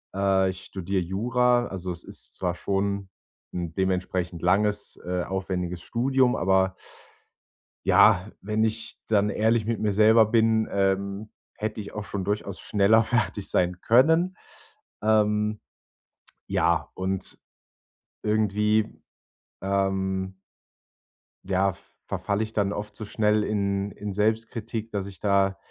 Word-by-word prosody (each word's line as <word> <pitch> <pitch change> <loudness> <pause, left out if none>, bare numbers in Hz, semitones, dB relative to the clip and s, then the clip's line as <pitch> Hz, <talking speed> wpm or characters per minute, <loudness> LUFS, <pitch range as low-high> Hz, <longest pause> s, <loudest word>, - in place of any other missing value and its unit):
Äh, 95 -1 +3
ich 95 0 -7
studiere 95 0 -2
Jura, 120 +6 +1
also, 95 -1 -5
es 85 - -11
ist - - -10
zwar 90 -2 -1
schon 100 +1 -1 0.5
’n 85 -2 -4
dementsprechend 90 -2 -1
langes, 105 +3 +1
äh, 90 0 -1
aufwendiges 90 -2 -3
Studium, 130 +2 +2
aber 95 +1 +2 1.1
ja, 90 +4 +5
wenn 105 +2 0
ich 110 0 -2
dann 105 -1 +3
ehrlich 110 +1 +2
mit 115 - -1
mir 105 -1 +1
selber 110 +2 +6
bin, 110 0 +3
ähm, 100 +1 0 0.2
hätte 110 0 -4
ich 100 - -7
auch 105 - -4
schon 100 -1 -4
durchaus 100 -1 -3
schneller 105 +2 +3
fertig 110 -4 -1
sein 90 0 +1
können. 160 +10 +4 0.7
Ähm. 105 0 +2 0.9
Ja, - - +1
und 95 0 -4 0.8
irgendwie, 105 0 +1 0.6
ähm 95 -1 -1 1.1
ja, 95 0 +1 0.3
verfalle 100 +1 -1
ich 110 0 -7
dann 100 -2 +1
oft 105 0 -6
so 110 - -6
schnell 105 0 +1
in 100 -1 -1
in 105 -1 -6
Selbstkritik, 110 +1 -1
dass 100 -2 -2
ich 100 -1 -10
da, 100 -1 +2
100 Hz, 125 wpm, -26 LUFS, 95-110 Hz, 1.1 s, selber